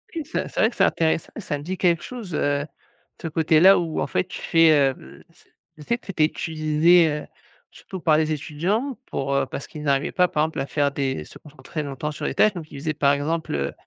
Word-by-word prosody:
Oui, 320 -3 -3
ça, 310 - -3
c'est - - -6
vrai 220 - +4
que 235 - -14
c'est - - +2
intéressant. 160 -1 +1
Ça 180 -9 -3
me 145 - -9
dit 185 +4 -4
quelque 170 -2 +2
chose, 220 -9 -7
heu, 145 -1 +1
de - - -10 0.5
ce - - -3
côté 160 0 +2
là 190 +4 +8
où 165 -2 -3
en - - -1
fait - - 0
tu - - -8
fais, 165 -1 +5
heu, 140 -3 +4
l - - -15
c'est, - - -26 0.3
je 150 - -11
sais 235 +10 0
que - - -26
c'était 170 -6 +1
utilisé, 160 +2 +3
heu, 150 0 -4 0.5
surtout 190 - -9
par 160 -3 +3
les 155 0 +1
étudiants. 180 - -2
Pour, 140 0 -2
heu 135 -1 +2
parce 135 +1 -7
qu'ils 150 - -9
n'arrivaient 140 -1 +1
pas 180 -1 +3
par 150 -3 0
exemple 160 +1 -3
à - - -1
faire 145 -1 0
des 135 - -2
se - - -13
concentrer 150 +1 -7
longtemps 145 +1 -4
sur 150 - -6
les - - -2
tâches. 215 - +4
Donc 165 -4 -8
ils 140 - -8
faisaient 155 +2 -2
par 140 -2 +3
exemple, 155 +3 -2
heu, 70 0 -2
155 Hz, 250 wpm, -23 LUFS, 145-175 Hz, 0.5 s, là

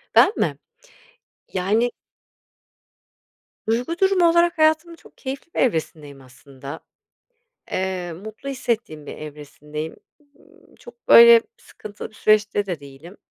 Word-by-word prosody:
Ben - - +7
mi? - - 0 1.0
Yani 210 +6 +1 1.8
Duygu 245 +9 -1
durumu 380 -3 +4
olarak 340 0 +3
hayatımın 315 +2 +2
çok - - -20
keyifli 275 +5 -7
bir - - -3
evresindeyim 155 - -2
aslında. 135 +3 -11 0.9
Eee, 185 -2 -2
mutlu 215 +9 -9
hissettiğim 235 - -3
bir - - -8
evresindeyim. 150 +1 -8 0.2
Imm, 290 -1 -25
çok 240 0 -16
böyle 235 0 +9 0.2
sıkıntılı 215 - -10
bir 215 - -23
süreçte 210 -1 +2
de 175 -6 -4
değilim. 140 +7 -13
215 Hz, 115 wpm, -22 LUFS, -, 1.8 s, böyle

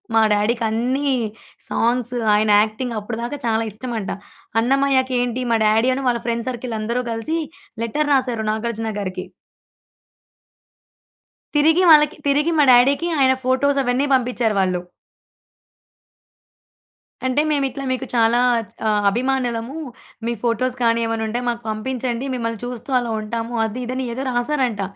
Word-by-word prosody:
మా 225 - +6
డాడీకన్ని 235 +5 0 0.6
సాంగ్స్ 245 +1 0 0.2
ఆయన 215 0 +2
యాక్టింగ్ 225 +2 -2
అప్పటిదాకా 235 +6 -5
చాలా 225 0 +1
ఇష్టమంట. 225 -2 -5 0.5
అన్నమయ్యకి 265 0 +2
ఏంటి 245 +1 -2
మా - - +4
డాడీ 220 +3 +3
అను 270 -1 -4
వాళ్ళ 235 -1 -1
ఫ్రెండ్ 235 +1 -1
సర్కిల్ 240 -2 -4
అందరూ 235 +3 -1
కలిసి 230 +9 -2 0.5
లెటర్ 290 +6 -1
రాసారు 245 -5 0
'నాగార్జున' 220 -1 -3
గారికి. 185 -2 -5 2.3
తిరిగి 320 +5 +4
వాళ్ళకి 300 -1 +6
తిరిగి 295 +4 +2
మా 295 - +5
డాడీకి 275 +7 +4
ఆయన 260 -1 +5
ఫోటోస్ 275 +2 +2
అవన్నీ 250 +3 +1
పంపించ్చారు 245 -4 +1
వాళ్ళు. 185 -1 0 2.5
అంటే 260 +3 +2
మేమిట్లా 275 -1 -1
మీకు 260 +1 -2
చాలా 230 +1 +4 0.3
చ్ - - -27
ఆహ్, 210 -1 +2
అభిమానులము. 245 +1 -1 0.5
మీ 235 - 0
ఫోటోస్ 245 +2 0
కానీ 230 0 +3
ఏమన్నా 225 -1 -2
ఉంటే 235 +3 -2
మాకు 235 0 -3
పంపించండి. 245 +3 -3
మిమ్మల్ని 230 -3 -3
చూస్తూ 245 +1 -7
అలా 235 -2 -3
ఉంటాము. 230 +2 -4
అది 220 +3 -4
ఇది 255 +2 -4
అని 260 -1 -2
ఏదో 265 +3 -4
రాసారంట. 245 -3 0
240 Hz, 130 wpm, -21 LUFS, 225-260 Hz, 2.5 s, మా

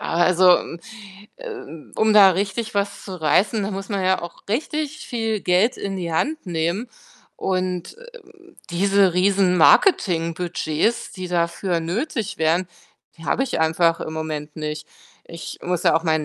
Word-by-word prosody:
Also, 180 +1 +4
m 170 - -8 0.6
äh, - - -11 0.5
um 220 0 +3
da 200 -2 +8
richtig 200 +4 -2
was 200 0 -2
zu 190 - -7
reißen, 200 +8 +2
da 200 - -2
muss 195 0 -6
man 200 -3 -2
ja 185 0 +2
auch 170 - -9
richtig 305 +6 -3
viel 225 -3 -2
Geld 185 +7 +2
in 195 -1 -4
die 170 -3 -4
Hand 310 - -1
nehmen. 170 +7 -2 0.5
Und, 185 - -2
äh, 485 0 -13 0.5
diese 195 +1 +3
Riesenmarketingbudgets, 180 - +2
die 185 -2 -6
dafür 170 +1 0
nötig 220 - -3
wären, 165 +3 +2 0.5
die 165 - -11
habe 265 - +1
ich 255 - -3
einfach 165 +1 +2
im 155 - -5
Moment 155 -1 -5
nicht. 150 0 -5 0.4
Ich 170 0 -8
muss 180 -1 -2
ja - - +5
auch 165 - 0
meinen 155 -2 +1
185 Hz, 150 wpm, -22 LUFS, 165-210 Hz, 0.6 s, da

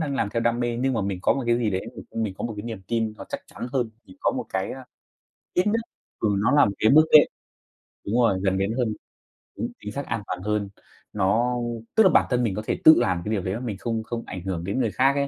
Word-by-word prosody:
đang 145 -3 -2
làm 130 - 0
theo 115 - -1
đam 115 +1 +1
mê 120 -1 -1
nhưng 130 +2 0
mà 115 - 0
mình 95 -1 -2
có - - +4
một 135 - -2
cái 120 0 +3
gì 115 -3 0
đấy 95 -1 -2 0.3
mình 110 -4 -2
có - - -4
một 115 -2 -3
cái 105 - -6
niềm 110 -4 -6
tin 115 -1 0
nó - - -8
chắc - - -4
chắn - - -7
hơn 125 -5 0 0.2
thì 95 - -15
có - - +2
một - - -3
cái 95 0 -2
ơ, 135 - -8 0.7
ít 180 +3 +2
nhất 225 +2 +1 0.4
ừ, 110 - +1
nó 100 - +2
là 145 0 +6
một 100 - 0
cái 110 - +4
bước 155 +2 +7
đệm. 150 - +9 0.8
Đúng 105 - -1
rồi, 100 -6 +3
gần 95 -1 +2
đến 100 +2 0
hơn. 125 -2 +1 0.7
Đúng, - - -2
chính 105 - -6
xác, 140 +6 -4
an 115 -2 -2
toàn 90 0 -4
hơn. 105 0 -1 0.4
Nó 105 +5 +2 0.4
tức 220 - +7
là 190 - +6
bản - - +4
thân 125 -1 +1
mình 105 -5 0
có 105 - -2
thể - - -1
tự 160 - +10
làm 90 -2 +1
cái 105 - -2
điều 105 -3 0
đấy 95 +1 -2
mà 110 - -3
mình 115 -6 -4
không 115 +2 -2
không 115 +1 -5
ảnh 90 - -6
hưởng 90 -3 -3
đến 100 +8 -2
người 115 -5 +1
khác 135 +5 +3
ấy, 140 0 +1
115 Hz, 280 wpm, -25 LUFS, 100-125 Hz, 0.8 s, tự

